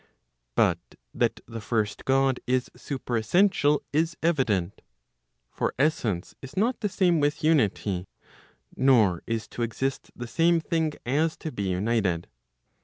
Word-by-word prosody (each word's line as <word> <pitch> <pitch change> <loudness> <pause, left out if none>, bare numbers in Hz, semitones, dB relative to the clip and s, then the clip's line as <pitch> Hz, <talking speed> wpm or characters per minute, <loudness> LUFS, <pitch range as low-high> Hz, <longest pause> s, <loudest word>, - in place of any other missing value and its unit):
But - - +3 0.3
that - - 0
the 115 -1 -7
first 110 -1 -2
God 135 -1 +2
is 125 0 +1
superessential,* 145 - +1
is 165 +2 +1
evident. 110 - 0 0.7
For - - -2
essence 120 - 0
is 135 +4 -11
not 235 +6 +1
the 210 - -1
same 180 -4 +2
with 145 +1 0
unity, 105 - +1 0.7
nor 115 -10 +4
is 115 -1 -2
to - - -6
exist 130 +4 -2
the 120 - -6
same 165 +7 +2
thing 160 -1 -1
as 155 +6 +1
to 160 - -5
be 100 -6 -3
united. 95 -2 0
130 Hz, 130 wpm, -26 LUFS, 110-160 Hz, 0.7 s, nor